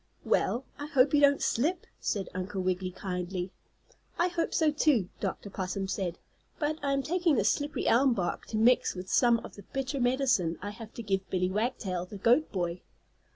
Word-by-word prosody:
"Well, 250 Hz, +3 st, +1 dB
I 290 Hz, -, -4 dB
hope 275 Hz, -1 st, +3 dB
you 290 Hz, -, +5 dB
don't 285 Hz, 0 st, +5 dB
slip," 325 Hz, +9 st, 0 dB
said 200 Hz, -4 st, -2 dB
Uncle 185 Hz, +1 st, -3 dB
Wiggily, 185 Hz, 0 st, 0 dB
kindly. 180 Hz, 0 st, -4 dB, 0.7 s
"I 350 Hz, +1 st, +2 dB
hope 345 Hz, -1 st, -1 dB
so, 315 Hz, -2 st, +3 dB
too," 285 Hz, -, +2 dB
Dr. 200 Hz, 0 st, -4 dB
Possum 190 Hz, 0 st, -3 dB
said. 185 Hz, -3 st, -2 dB, 0.4 s
"But 310 Hz, 0 st, -1 dB
I 280 Hz, -1 st, 0 dB
am 275 Hz, 0 st, 0 dB
taking 345 Hz, -1 st, +2 dB
this -, -, +3 dB
slippery 290 Hz, 0 st, -2 dB
elm 255 Hz, +1 st, +4 dB
bark 180 Hz, -4 st, -2 dB
to 220 Hz, -, -3 dB
mix 240 Hz, 0 st, +4 dB
with 185 Hz, +1 st, -6 dB
some 240 Hz, -2 st, +5 dB
of -, -, -10 dB
the 205 Hz, -, -11 dB
bitter 270 Hz, +1 st, -2 dB
medicine 245 Hz, -, +2 dB
I 205 Hz, -, -5 dB
have 220 Hz, +1 st, -10 dB
to 235 Hz, -, -6 dB
give 195 Hz, -2 st, -1 dB
Billie 185 Hz, 0 st, 0 dB
Wagtail, 195 Hz, -5 st, -2 dB
the 205 Hz, -, -8 dB
goat 245 Hz, +10 st, +3 dB
boy. 175 Hz, -2 st, -2 dB
220 Hz, 190 wpm, -29 LUFS, 185-280 Hz, 0.7 s, you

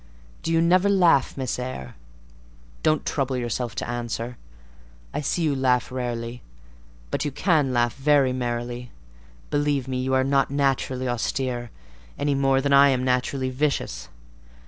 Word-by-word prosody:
Do 165 Hz, -, -2 dB
you 165 Hz, 0 st, +3 dB
never 185 Hz, +4 st, +4 dB
laugh, 175 Hz, -10 st, +3 dB
Miss 130 Hz, -2 st, -2 dB
Eyre? 125 Hz, -, -5 dB, 0.9 s
Don't 155 Hz, 0 st, +1 dB
trouble 135 Hz, -2 st, -1 dB
yourself 120 Hz, -1 st, -3 dB
to -, -, -3 dB
answer—I -, -, -7 dB
see 165 Hz, +4 st, -1 dB
you 150 Hz, -3 st, +1 dB
laugh 125 Hz, -2 st, +1 dB
rarely; 120 Hz, -1 st, -4 dB, 0.7 s
but -, -, -1 dB
you 150 Hz, -, -1 dB
can 150 Hz, -2 st, +1 dB
laugh 120 Hz, -2 st, +1 dB
very 140 Hz, -2 st, +3 dB
merrily: 120 Hz, 0 st, -3 dB, 0.6 s
believe 145 Hz, -2 st, 0 dB
me, 130 Hz, -1 st, -2 dB
you 130 Hz, +1 st, 0 dB
are 130 Hz, -, +3 dB
not 135 Hz, 0 st, +2 dB
naturally 135 Hz, -2 st, 0 dB
austere, 120 Hz, 0 st, -2 dB, 0.5 s
any 145 Hz, 0 st, +1 dB
more 135 Hz, -1 st, +2 dB
than 140 Hz, 0 st, +1 dB
I 140 Hz, 0 st, +7 dB
am 130 Hz, -2 st, +1 dB
naturally 130 Hz, +1 st, 0 dB
vicious. 140 Hz, +3 st, -2 dB
130 Hz, 145 wpm, -24 LUFS, 120-140 Hz, 0.9 s, I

